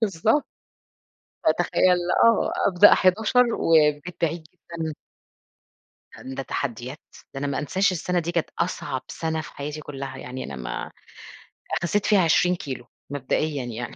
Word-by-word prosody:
بالضبط. 220 - +2 1.0
فتخيّل 180 -1 +3 0.3
آه، 230 -2 +4 0.2
أبدأ 195 +2 +7
11:00 220 +6 +3
والبيت 155 +1 +2
بعيد 165 0 -1
جدًا. 165 -2 -6 1.2
هَند 130 0 -9
ده 135 - -2
تحدّيات، 130 +2 -4 0.3
ده 135 - -5
أنا 145 - -2
ما 140 - -1
أنساش 185 +7 +1
السنة 180 0 -1
دي 170 0 -3
كانت 170 -2 -1
أصعب 170 -6 -2
سنة 160 -1 -3
في 150 - -11
حياتي 150 +2 -5
كُلّها، 135 -2 -7
يعني 130 0 -6
أنا 70 - -7
ما 60 -1 -5 0.9
خسّيت 195 +4 0
فيها 210 -2 +4
20 180 +2 +3
كيلو 130 -7 -6 0.2
مبدئيًا 145 +1 -1
يعني، 120 -1 -6
160 Hz, 140 wpm, -24 LUFS, 135-180 Hz, 1.2 s, أبدأ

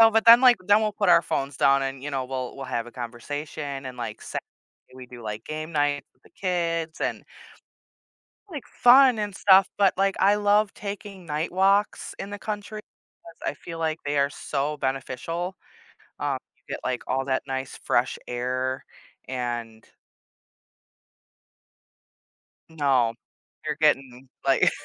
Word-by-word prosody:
So, 225 0 +9
but 225 0 +2
then, 230 +1 +10
like 250 -2 +7
then 205 +1 +6
we'll 215 -1 0
put 205 -2 0
our 170 -1 +7
phones 135 -3 -2
down 140 0 +4
and, 135 -1 -4
you 145 - -4
know, 135 -2 -2
we'll 130 0 -5
we'll 135 - -6
have 115 -2 -2
a - - -12
conversation, 140 +3 -5
and, 130 -1 -7
like, 115 -3 -5
se - - -4 0.6
we 130 -1 -10
do, 120 -1 -11
like, 105 0 -5
game 155 +1 -5
night 145 -2 +1
with - - -40
the - - -20
kids 170 -3 -2
and - - -2 1.2
like, 300 -7 -7
fun 250 -1 +6
and 205 -2 -3
stuff, 190 -1 +6
but, 200 -2 +3
like, 195 0 +1
I 200 +2 +5
love 205 0 +3
taking 200 -2 -7
night 155 +2 -2
walks 195 +3 +2
in 195 - -6
the 205 - -6
country 210 0 -5 0.4
'cause 165 0 -7
I - - -9
feel 165 +4 -9
like 160 -1 -1
they 145 0 0
are 140 0 +2
so 145 +1 -2
beneficial, 145 +7 -3 0.6
um, 140 -2 -1 0.2
you - - -37
get, - - -6
like, 125 -1 -2
all 135 +1 0
that 130 -1 0
nice 130 0 -4
fresh - - 0
air 130 +2 -2 0.4
and 120 -3 -4 2.8
No. 135 -7 +2 0.5
You're 150 - -1
getting, 135 -4 +1 0.2
like, - - +4
150 Hz, 160 wpm, -25 LUFS, 130-195 Hz, 2.8 s, then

